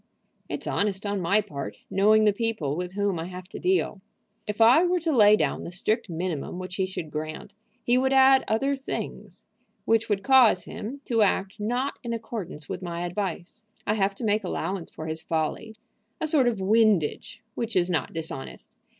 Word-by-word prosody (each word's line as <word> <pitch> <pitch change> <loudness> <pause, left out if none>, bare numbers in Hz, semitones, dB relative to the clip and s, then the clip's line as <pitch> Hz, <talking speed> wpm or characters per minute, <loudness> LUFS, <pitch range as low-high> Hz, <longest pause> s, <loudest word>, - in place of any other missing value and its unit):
"It's - - -4
honest 200 0 -1
on 200 -1 -1
my 200 +5 +3
part, 145 -10 -7
knowing 215 +2 +4
the 210 -1 +4
people 210 - -2
with 180 +2 -4
whom 200 -3 0
I 165 - -4
have 180 0 -8
to - - -8
deal. 370 - +1 0.5
If 210 +1 -4
I 240 +9 +7
were 360 0 +2
to 325 -3 0
lay 210 -2 +7
down - - -1
the - - -6
strict 195 +4 -1
minimum 170 -2 -3
which 185 0 -6
he 190 -1 +1
should 170 -5 -6
grant, 155 +6 -6 0.3
he 245 +1 +3
would 265 +1 +1
add 265 0 +6
other 270 +6 +1
things 270 0 -6 0.4
which 225 0 +2
would 200 -1 0
cause 250 -9 +5
him 260 +11 -7
to 230 -2 +1
act 195 0 +1
not 245 +6 -2
in 235 -1 -3
accordance 210 -9 -6
with 190 -1 -5
my 175 -1 -4
advice. 180 +2 -4 0.2
I 210 - +1
have 200 -2 0
to 235 - -7
make 215 0 +1
allowance 180 +1 -3
for 155 - -8
his 160 0 -3
folly, 165 +7 -2 0.4
a - - -1
sort 295 -5 +3
of 230 -4 0
windage, 205 -5 +1
which 230 -1 -4
is 175 -1 +3
not 175 -4 -1
dishonest. 160 -5 -7
205 Hz, 190 wpm, -26 LUFS, 180-230 Hz, 0.5 s, I